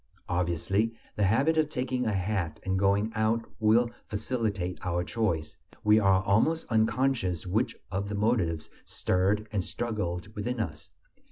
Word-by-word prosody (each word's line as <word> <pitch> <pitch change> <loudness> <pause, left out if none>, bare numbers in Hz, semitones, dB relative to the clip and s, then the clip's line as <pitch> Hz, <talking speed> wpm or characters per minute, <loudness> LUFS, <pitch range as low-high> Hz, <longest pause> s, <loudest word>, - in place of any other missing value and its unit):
Obviously, 90 +6 0 0.2
the 105 - +2
habit 140 +11 +3
of 155 -1 +2
taking 125 -2 -1
a - - +2
hat 95 -4 -1
and 95 0 0
going 100 +3 +2
out 110 +1 +1
will 115 +2 +4 0.2
facilitate 105 -5 -2
our 90 -1 0
choice; 90 -6 -1 0.3
we 105 +1 +6
are 95 -2 +4
almost 130 +13 +2
unconscious 110 -5 +1
which 110 +6 0 0.2
of 100 +2 -2
the 105 - -3
motives 100 -7 0
stirred 100 +4 0
and 100 -4 0
struggled 105 -3 -3
within 115 +4 -2
us. 80 -8 -4
105 Hz, 145 wpm, -29 LUFS, 90-115 Hz, 0.3 s, we